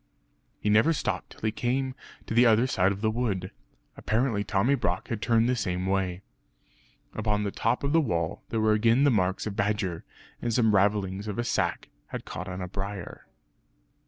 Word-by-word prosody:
He - - -4
never 110 +10 +5
stopped - - -2
till - - -16
he 110 - 0
came 130 +4 -1 0.3
to - - -4
the 120 +2 +6
other 115 +2 +5
side 95 -7 +2
of 100 0 -5
the 110 0 +2
wood. 105 -6 -2 0.4
Apparently 110 -2 0
Tommy 105 +6 +2
Brock 95 -9 -1
had 115 -3 -3
turned 115 0 +3
the 125 - +2
same 90 -5 -2
way. 95 -1 -1 0.9
Upon 105 -1 0
the 100 - -2
top 125 - 0
of 140 +1 0
the 165 - +5
wall, 85 - -1
there 115 - -1
were 110 0 +4
again 115 +5 +3
the 145 - +5
marks 95 -4 +1
of 105 -2 -4
badger; 100 -5 -1 0.4
and 120 - -1
some 110 -2 +3
ravellings 100 0 +1
of 105 - -4
a 120 - 0
sack 120 - -1 0.2
had - - -6
caught - - -6
on 90 0 -5
a 90 - -3
briar. 95 0 -6
105 Hz, 190 wpm, -27 LUFS, 95-120 Hz, 0.9 s, the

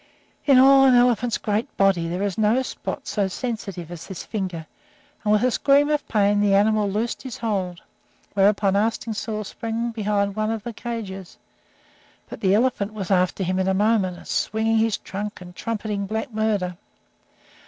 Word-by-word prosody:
In 275 -2 +7
all 270 +1 +7
an 260 -2 +6
elephant's 245 -1 +3
great 215 +6 -2
body, 195 -4 +3
there 180 +4 -2
is 200 -3 -1
no 220 +4 +2
spot 280 +2 -6
so 205 -6 0
sensitive 195 -6 -5
as 170 -2 -8
this 190 -4 -7
finger, 185 -7 -4 0.6
and, 210 - +1
with 210 +1 +3
a 255 - +3
scream 285 +4 +3
of 300 -1 -1
pain, 205 -1 +2
the 205 -1 +3
animal 210 0 +3
loosed 220 +4 -2
his 260 -4 -7
hold, 190 -6 -3 0.5
whereupon 200 0 +3
Arstingstall 220 0 -1
sprang 230 +3 -3
behind 205 -2 -1
one 215 0 -1
of 225 -2 -3
the 235 - -5
cages. 205 -6 -6 0.9
But - - -9
the 190 0 +3
elephant 215 -3 0
was 200 -2 -4
after 185 +1 +2
him 185 +1 -1
in 190 - 0
a 190 - +2
moment, 200 -3 +1
swinging 220 +1 +1
his 220 -1 +1
trunk 205 +2 -6
and 180 -1 -12
trumpeting 210 -3 -3
black 220 +4 -4
murder. 205 -5 -1
210 Hz, 170 wpm, -23 LUFS, 195-230 Hz, 0.9 s, In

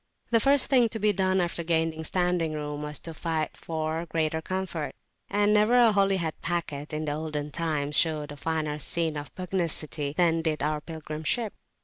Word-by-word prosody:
The 230 - +5
first 275 +3 +4
thing 245 -4 +4
to 220 - -5
be 210 0 +3
done 190 0 +2
after 170 -1 -1
gaining 160 -1 +1
standing 175 -2 0
room 150 -1 -4
was 150 0 -3
to 165 - -6
fight 160 -1 -2
for 160 +1 -3
greater 160 0 0
comfort; 185 -3 -3 0.3
and 205 +1 +3
never 215 +3 +4
a 235 -2 +7
Holyhead 195 -5 +2
packet 160 -4 -2
in 155 0 -2
the 150 - -1
olden 150 -1 -3
time 155 -4 -1
showed 150 -1 +2
a - - -7
finer 155 -1 -2
scene 165 0 -1
of 145 0 -6
pugnacity 165 -5 -1
than 165 -2 +3
did 160 -2 -1
our 150 0 0
pilgrim 155 -1 -7
ship. 225 +5 0
160 Hz, 185 wpm, -27 LUFS, 155-185 Hz, 0.3 s, a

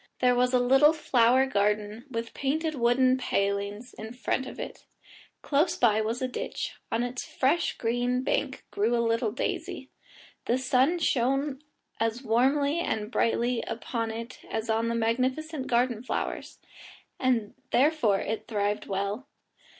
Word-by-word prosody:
There 250 0 +4
was 250 0 +2
a 255 - +4
little 270 +5 +5
flower 255 -4 +3
garden 210 -1 0
with 230 -2 -4
painted 310 +4 -1
wooden 255 0 +3
palings 200 +2 -1
in 220 +2 -8
front 255 +1 -2
of - - -9
it; - - -7 0.6
close 310 +4 +2
by 220 -3 +4
was 230 +4 -2
a - - +1
ditch, 250 - -4 0.2
on 230 +1 +1
its 245 +1 -4
fresh 305 +6 0
green 245 +2 0
bank 270 0 -1
grew 225 +4 +1
a 235 0 +1
little 230 -1 +1
daisy; 235 - -4 0.5
the 240 - +2
sun 260 +6 +2
shone 275 -1 0 0.4
as 225 +3 -1
warmly 275 +7 +2
and 220 -9 -2
brightly 235 0 +1
upon 230 0 -3
it 230 +2 -7
as 220 0 -2
on 225 +1 +1
the 235 - 0
magnificent 260 +6 -1
garden 240 -2 +1
flowers, 250 - -4 0.6
and 240 -5 +1 0.2
therefore 255 -8 +3
it 220 +1 -4
thrived 205 -2 -1
well. 200 +7 -3
245 Hz, 145 wpm, -28 LUFS, 225-265 Hz, 0.6 s, little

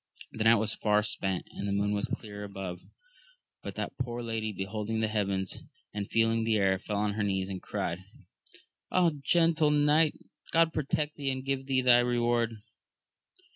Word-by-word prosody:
The 110 - -3
night 115 +1 +8
was 110 -1 0
far 105 -1 +2
spent, 95 -3 -2
and 100 - -5
the - - -1
moon 100 +1 +1
was 105 0 -1
clear 105 -2 -6
above; 95 -3 -6 0.8
but - - -7
that - - -5
poor 120 -1 -3
lady 110 -2 -2
beholding 105 +3 -3
the 110 - +1
heavens, 100 -3 -1 0.3
and 100 -1 -4
feeling 115 0 +2
the 110 -1 +2
air, 95 -2 +2
feU 105 - -4
on 105 0 0
her 105 0 -1
knees, 95 -1 -1
and 95 -1 -5
cried. 85 - -3 0.9
Ah, 180 -2 +4
gentle 165 0 +3
knight, 150 +1 +4 0.4
God 165 0 +4
protect 150 0 -1
thee 140 -2 -1
and 130 0 -3
give 135 -1 -2
thee 130 -1 +2
thy 125 -1 +6
reward 120 -2 +1
110 Hz, 175 wpm, -30 LUFS, 100-130 Hz, 0.9 s, night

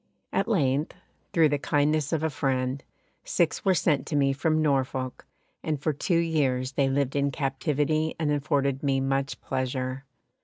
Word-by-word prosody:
At 195 - +1
length, 150 - +1 0.4
through 160 -3 +4
the 145 0 0
kindness 150 +1 +1
of 160 -2 0
a 160 - 0
friend, 130 -1 -1 0.4
six - - 0
were 190 -1 +3
sent 150 -4 +1
to 155 - -2
me 135 -1 +3
from 155 +3 +1
Norfolk, 135 -3 -1 0.3
and 155 -2 -2
for 155 +2 0
two 170 +5 0
years 140 -6 +1
they 135 -1 +1
lived 135 0 0
in 140 0 +2
captivity 150 +3 0
and 155 -2 +1
afforded 140 -2 0
me 135 -2 +1
much 135 +1 -1
pleasure. 130 0 -3
140 Hz, 160 wpm, -27 LUFS, 135-155 Hz, 0.4 s, through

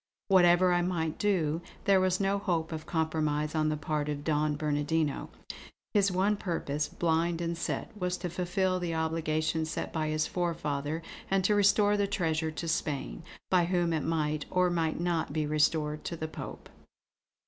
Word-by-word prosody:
Whatever 180 -1 +5
I 175 - +3
might 165 -3 -1
do, 170 -6 +1 0.2
there 195 -1 +5
was 185 0 +2
no 200 0 +1
hope 170 -5 -1
of 160 -1 -6
compromise 155 -2 0
on 155 -1 +1
the 155 - -1
part 150 0 -2
of 145 -1 -3
Don 150 -1 +1
Bernardino. 150 0 -1 0.6
His 200 -2 +3
one 195 +3 +2
purpose, 150 -6 -2
blind 165 0 0
and 170 0 -2
set, 190 +6 -4
was 180 -3 -2
to 180 - -4
fulfill 185 +1 0
the 170 -2 -2
obligation 160 0 0
set 155 - -4
by 155 -1 -1
his 155 0 0
forefather 160 -3 -2 0.3
and 195 0 +2
to 210 - +3
restore 205 0 +4
the 200 -1 +1
treasure 160 -5 0
to 155 +2 -5
Spain, 140 - -2 0.3
by 180 -2 +4
whom 175 -1 +1
it 160 - 0
might 155 -2 -1
or 180 0 +2
might 165 -2 0
not 170 -4 -1
be 155 -1 0
restored 150 0 +1
to 170 - -3
the 160 - -3
Pope. 160 - -8
165 Hz, 170 wpm, -30 LUFS, 155-180 Hz, 0.6 s, Whatever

